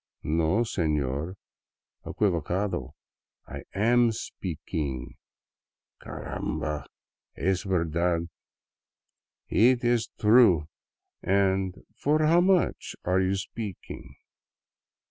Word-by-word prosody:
" - - -46
No, 80 +7 +1
sefior, 75 - -1 0.7
equivocado, 90 - -1 0.4
/ - - -12
am 120 +4 +4
speakeeng." 75 - -5 0.4
" - - -36
Caramba! 75 -2 -4 0.5
Es 95 -1 +1
verdad. 85 -2 0 1.2
Eet 125 +2 +4
ees 120 -2 +2
true. 105 -9 +5 0.5
And 95 -1 +1
for 155 +2 +2
how 170 +3 +5
much 185 -1 +1
are 90 +1 +2
you 95 +1 +1
speakeeng?" 95 - -7
95 Hz, 85 wpm, -27 LUFS, 80-110 Hz, 1.2 s, true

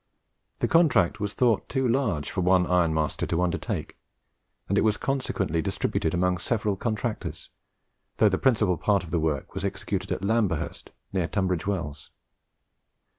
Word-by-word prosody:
The - - +3
contract 130 - +3
was 105 -1 -2
thought 120 -4 +2
too 130 -2 +1
large 115 - 0
for 95 - -1
one 90 0 +4
iron 90 -2 +2
master 80 -2 -1
to 85 +1 0
undertake, 90 - -3 0.7
and 100 - 0
it - - +4
was 110 -1 +2
consequently 130 - -1
distributed 80 - -1
amongst 90 0 0
several 105 -4 +1
contractors, 110 +2 -4 0.7
though 110 - +5
the 95 -2 +1
principal 105 -9 +3
part 100 +1 +2
of 85 - -10
the 85 - +1
work 75 -3 -2
was - - -4
executed - - -3
at - - -2
Lamberhurst, 100 -6 -1 0.2
near 90 -4 0
Tunbridge 95 -3 -1
Wells. 75 -7 -3
95 Hz, 155 wpm, -26 LUFS, 85-110 Hz, 0.7 s, though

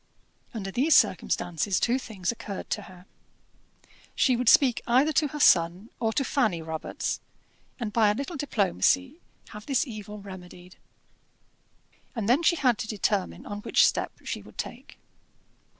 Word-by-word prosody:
Under 195 -4 -5
these 285 +9 +3
circumstances 175 +3 +1
two 245 +2 +1
things 205 -7 -3
occurred 210 -4 -7
to - - -1
her. 180 0 -15 1.1
She 255 - +3
would 240 -1 +2
speak 255 -5 +5
either 265 +6 +3
to 300 +1 +2
her 295 +2 -7
son 175 -2 +3
or 225 -1 0
to 275 - +1
Fanny 220 - +1
Robarts, 160 -1 -4 0.6
and 220 -4 -4
by 220 -3 +4
a 205 - +1
little 280 +8 -5
diplomacy 270 - +1 0.3
have 210 +1 -11
this 275 -1 +1
evil 210 -4 -8
remedied. 180 -2 -12 1.4
And 220 -4 -2
then 255 +7 +4
she 340 +1 +3
had 255 -7 +2
to 235 - -4
determine 205 -2 -1
on 205 0 -6
which - - +4
step - - 0
she - - -4
would - - -16
take. - - -7
220 Hz, 150 wpm, -27 LUFS, 195-265 Hz, 1.4 s, speak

